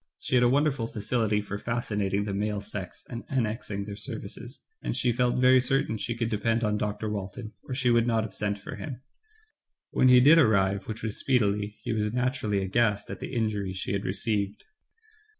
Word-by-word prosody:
She -, -, -5 dB
had 125 Hz, -1 st, +5 dB
a 120 Hz, -, +5 dB
wonderful 140 Hz, -3 st, +2 dB
facility 110 Hz, -1 st, 0 dB
for 105 Hz, 0 st, -5 dB
fascinating 105 Hz, -4 st, -1 dB
the 100 Hz, -, -3 dB
male 105 Hz, +1 st, -1 dB
sex 100 Hz, -2 st, -7 dB
and 120 Hz, -1 st, -6 dB
annexing 110 Hz, -5 st, -2 dB
their 100 Hz, -1 st, -6 dB
services, 120 Hz, +2 st, -6 dB, 0.2 s
and -, -, -2 dB
she 125 Hz, -, +2 dB
felt 125 Hz, +1 st, +1 dB
very 130 Hz, 0 st, +6 dB
certain 135 Hz, -3 st, +1 dB
she 115 Hz, +2 st, -3 dB
could 115 Hz, -1 st, -1 dB
depend 115 Hz, +2 st, +1 dB
on 105 Hz, -1 st, +1 dB
Dr. 105 Hz, +1 st, -2 dB
Walton, 105 Hz, +2 st, -5 dB
or 130 Hz, -, -4 dB
she 130 Hz, -2 st, +2 dB
would 120 Hz, 0 st, +3 dB
not 115 Hz, -2 st, +2 dB
have 110 Hz, -, -6 dB
sent 105 Hz, -1 st, -2 dB
for 100 Hz, -, -8 dB
him. 130 Hz, -4 st, -7 dB, 0.9 s
When 130 Hz, -, +4 dB
he 125 Hz, 0 st, +8 dB
did 150 Hz, +6 st, +7 dB
arrive, 100 Hz, -7 st, +3 dB
which 110 Hz, -1 st, -6 dB
was 110 Hz, -2 st, -2 dB
speedily, 105 Hz, -5 st, +1 dB
he -, -, -1 dB
was 105 Hz, -1 st, 0 dB
naturally 120 Hz, -5 st, 0 dB
aghast 105 Hz, +1 st, +1 dB
at -, -, -6 dB
the -, -, -6 dB
injury 105 Hz, -4 st, -1 dB
she 95 Hz, +1 st, -3 dB
had 100 Hz, 0 st, -1 dB
re -, -, -1 dB
ceived. 105 Hz, -2 st, -1 dB
110 Hz, 200 wpm, -28 LUFS, 105-120 Hz, 0.9 s, he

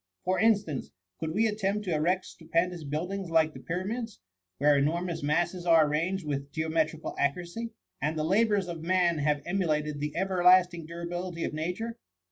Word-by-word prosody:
For 185 Hz, +1 st, +1 dB
instance, 205 Hz, -, +2 dB, 0.3 s
could 160 Hz, -, -2 dB
we 210 Hz, +8 st, +2 dB
attempt 210 Hz, -1 st, -1 dB
to 180 Hz, -, 0 dB
erect 175 Hz, +5 st, +1 dB
stupendous 170 Hz, +1 st, -2 dB
buildings 175 Hz, +6 st, -3 dB
like 160 Hz, -1 st, +3 dB
the 130 Hz, -, -9 dB
pyramids, 195 Hz, -, -4 dB, 0.4 s
where 145 Hz, +1 st, +4 dB
enormous 165 Hz, +4 st, 0 dB
masses 170 Hz, +5 st, 0 dB
are 165 Hz, -2 st, +6 dB
arranged 165 Hz, +5 st, -1 dB
with 140 Hz, -1 st, -3 dB
geometrical 160 Hz, 0 st, -1 dB
accuracy, 175 Hz, +10 st, -1 dB, 0.3 s
and 155 Hz, +2 st, -1 dB
the 155 Hz, -, 0 dB
labours 200 Hz, +2 st, +2 dB
of 170 Hz, -2 st, -5 dB
man 175 Hz, -1 st, +2 dB
have 145 Hz, 0 st, +1 dB
emulated 155 Hz, -5 st, 0 dB
the 150 Hz, 0 st, -3 dB
ever 185 Hz, 0 st, 0 dB
lasting 180 Hz, -2 st, +5 dB
durability 170 Hz, +1 st, -4 dB
of -, -, -2 dB
nature? 180 Hz, +9 st, -3 dB
170 Hz, 160 wpm, -29 LUFS, 155-185 Hz, 0.4 s, are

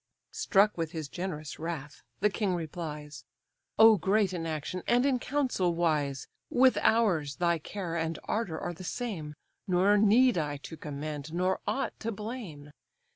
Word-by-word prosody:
Struck 200 Hz, -1 st, +3 dB
with 165 Hz, 0 st, -2 dB
his 160 Hz, -3 st, -4 dB
generous 155 Hz, -2 st, -5 dB
wrath, 155 Hz, -3 st, -5 dB, 0.2 s
the 210 Hz, -, +4 dB
king 195 Hz, -3 st, 0 dB
replies: 150 Hz, -5 st, -6 dB, 0.5 s
"O 220 Hz, 0 st, +8 dB
great 195 Hz, +2 st, +2 dB
in 165 Hz, -2 st, -3 dB
action, 160 Hz, +3 st, -3 dB
and 245 Hz, +2 st, +4 dB
in 265 Hz, -3 st, +2 dB
council 245 Hz, -12 st, 0 dB
wise! 150 Hz, -5 st, 0 dB, 0.2 s
With 255 Hz, +1 st, +4 dB
ours, 175 Hz, -11 st, +2 dB
thy 170 Hz, -1 st, +1 dB
care 175 Hz, +1 st, -5 dB
and 165 Hz, 0 st, -1 dB
ardour 200 Hz, -8 st, -2 dB
are 175 Hz, -, -4 dB
the 175 Hz, -, -10 dB
same, 175 Hz, -8 st, -4 dB, 0.3 s
Nor 190 Hz, +3 st, +4 dB
need 225 Hz, +1 st, +5 dB
I 145 Hz, -2 st, -2 dB
to 150 Hz, +3 st, -9 dB
commend, 150 Hz, 0 st, -6 dB
nor 185 Hz, +2 st, +1 dB
aught 270 Hz, -, -1 dB
to 230 Hz, -, -3 dB
blame. 205 Hz, -, -7 dB
175 Hz, 155 wpm, -29 LUFS, 155-210 Hz, 0.5 s, O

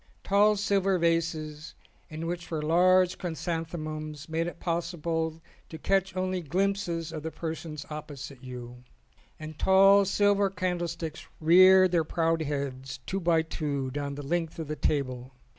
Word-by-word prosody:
Tall 205 Hz, +2 st, +4 dB
silver 195 Hz, -2 st, +1 dB
vases 165 Hz, -2 st, -1 dB, 0.3 s
in 155 Hz, +1 st, -6 dB
which 175 Hz, +1 st, -4 dB
were 155 Hz, -2 st, -3 dB
large 180 Hz, +3 st, +4 dB
chrysanthemums 155 Hz, -3 st, -4 dB
made 165 Hz, +1 st, -1 dB
it 175 Hz, -, -7 dB
possible 165 Hz, -1 st, -2 dB, 0.3 s
to 160 Hz, -, -7 dB
catch 190 Hz, +2 st, 0 dB
only 185 Hz, 0 st, -1 dB
glimpses 175 Hz, 0 st, -1 dB
of 155 Hz, -, -5 dB
the 160 Hz, -, -4 dB
persons 160 Hz, -2 st, -6 dB
opposite 140 Hz, -3 st, -8 dB
you, 125 Hz, -1 st, -9 dB, 0.6 s
and 155 Hz, 0 st, -9 dB
tall 195 Hz, +1 st, +6 dB
silver 200 Hz, 0 st, +2 dB
candlesticks 175 Hz, -4 st, -3 dB
reared 185 Hz, +3 st, +7 dB
their 170 Hz, -2 st, +3 dB
proud 165 Hz, +1 st, 0 dB
heads 135 Hz, -3 st, -4 dB
two 195 Hz, -, -2 dB
by 165 Hz, -3 st, +2 dB
two 145 Hz, -5 st, -3 dB
down 140 Hz, 0 st, -4 dB
the 145 Hz, 0 st, -7 dB
length 165 Hz, +1 st, -2 dB
of 160 Hz, -2 st, -5 dB
the 155 Hz, -, -2 dB
table. 130 Hz, -3 st, -2 dB
165 Hz, 140 wpm, -28 LUFS, 150-180 Hz, 0.6 s, reared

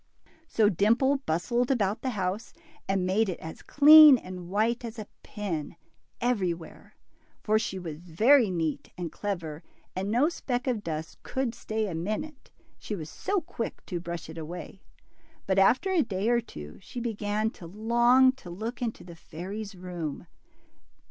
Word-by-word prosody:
So 220 Hz, -7 st, +3 dB
Dimple 230 Hz, -, +3 dB
bustled 235 Hz, +10 st, 0 dB
about 215 Hz, -5 st, +1 dB
the 260 Hz, -, -1 dB
house, 190 Hz, +5 st, -2 dB, 0.4 s
and 195 Hz, -2 st, +1 dB
made 200 Hz, +3 st, +2 dB
it 180 Hz, -, -4 dB
as 160 Hz, -, -8 dB
clean 300 Hz, -1 st, +9 dB
and 180 Hz, -4 st, -9 dB
white 225 Hz, +5 st, +1 dB
as 230 Hz, 0 st, -6 dB
a 215 Hz, -, -5 dB, 0.2 s
pin, 180 Hz, -9 st, -5 dB, 0.4 s
everywhere. 185 Hz, -9 st, -2 dB, 0.5 s
For 215 Hz, 0 st, +3 dB
she 190 Hz, -, -3 dB
was 165 Hz, -4 st, -6 dB
very 215 Hz, -, +4 dB
neat 165 Hz, -4 st, -2 dB
and 175 Hz, -3 st, -4 dB
clever, 170 Hz, -7 st, -4 dB, 0.3 s
and 190 Hz, +2 st, -2 dB
no 245 Hz, +7 st, +3 dB
speck 250 Hz, -7 st, -3 dB
of 240 Hz, -6 st, -1 dB
dust 160 Hz, 0 st, -5 dB
could 260 Hz, -3 st, -2 dB
stay 220 Hz, -2 st, -3 dB
a 185 Hz, -, -4 dB
minute, 215 Hz, -, -4 dB, 0.3 s
she 210 Hz, -, -4 dB
was 155 Hz, -4 st, -7 dB
so 395 Hz, -1 st, -1 dB
quick 235 Hz, -7 st, -6 dB
to 175 Hz, -, -3 dB
brush 170 Hz, -1 st, -6 dB
it 160 Hz, +1 st, -8 dB
away. 175 Hz, +4 st, -8 dB, 0.6 s
But 190 Hz, 0 st, +2 dB
after 255 Hz, -, +4 dB
a 360 Hz, -4 st, +4 dB
day 200 Hz, -3 st, -1 dB
or 240 Hz, 0 st, +3 dB
two 75 Hz, -, -10 dB
sheT 245 Hz, -, -7 dB
began 215 Hz, -1 st, -1 dB
to 170 Hz, -, -11 dB
long 240 Hz, +6 st, +4 dB
to 175 Hz, -, -10 dB
look 220 Hz, +8 st, -5 dB
into 230 Hz, -2 st, -3 dB
the 170 Hz, -1 st, -11 dB
fairy 180 Hz, +6 st, -7 dB
'^s 200 Hz, -3 st, -9 dB
room. 175 Hz, -5 st, -5 dB
205 Hz, 165 wpm, -28 LUFS, 175-240 Hz, 0.6 s, clean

